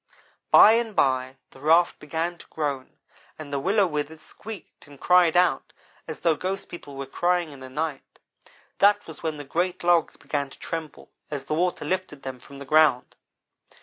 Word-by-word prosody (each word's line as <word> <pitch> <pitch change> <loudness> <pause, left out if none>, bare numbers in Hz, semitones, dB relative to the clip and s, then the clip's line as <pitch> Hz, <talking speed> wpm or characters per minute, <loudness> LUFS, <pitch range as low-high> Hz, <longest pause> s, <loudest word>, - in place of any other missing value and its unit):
"By 215 - +9
and 225 -2 0
by 130 0 +1
the - - -16
raft 165 +4 +3
began 165 +3 -3
to - - -13
groan, 140 -4 -4 0.4
and 145 -2 -9
the 140 - 0
willow 195 +6 +2
withes 155 -1 -4
squeaked 215 -2 -11
and 140 -1 -15
cried 180 -2 +4
out 180 0 +2 0.3
as 160 - -7
though 165 -2 +3
ghost 190 +4 -4
people 145 -5 -10
were 135 0 -5
crying 175 +3 0
in 140 - -12
the 130 0 -10
night. 150 0 -5 0.6
That 205 +1 +4
was 160 - -11
when 160 -2 -3
the 145 - -7
great 175 +6 -2
logs 175 -1 +2
began 140 -2 -3
to - - -15
tremble 165 -2 -7 0.2
as 145 -3 -5
the - - -3
water 175 +3 0
lifted 185 -6 -3
them 130 -1 -6
from 140 +3 -13
the 140 - -9
ground. 150 -3 +3
155 Hz, 180 wpm, -25 LUFS, 140-175 Hz, 0.6 s, By